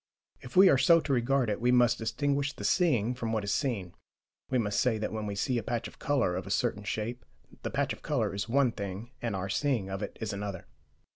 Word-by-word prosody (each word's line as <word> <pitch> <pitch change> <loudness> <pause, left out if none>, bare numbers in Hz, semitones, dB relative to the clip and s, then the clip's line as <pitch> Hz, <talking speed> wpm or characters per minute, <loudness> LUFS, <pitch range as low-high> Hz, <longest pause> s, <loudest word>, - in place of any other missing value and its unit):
If 125 - -11
we 190 +1 +8
are 135 -7 +5
so 165 +5 +6
to 145 - -1
regard 130 +1 +2
it, 105 0 -2
we 125 +1 +3
must 120 -1 +4
distinguish 140 +5 0
the - - -9
seeing 125 - +2
from 115 -2 -3
what 110 -2 0
is 100 - -1
seen: 110 - -2 0.6
we 130 - +1
must 105 -4 +1
say 125 -3 +2
that, 105 - -3
when 110 -1 -3
we 100 - -3
see 120 +4 0
a - - -3
patch 120 0 -3
of - - -15
colour 130 -11 +1
of 95 +1 -4
a - - -6
certain 105 0 0
shape, 110 +4 -3 0.4
the - - -3
patch - - 0
of - - -12
colour - - -1
is 100 +2 -3
one 130 0 +3
thing 100 +3 -6
and 115 -4 -2
our 95 0 -3
seeing 110 -2 0
of 95 +1 -4
it - - -5
is 110 -2 -3
another. 100 -2 -5
115 Hz, 240 wpm, -30 LUFS, 100-130 Hz, 0.6 s, we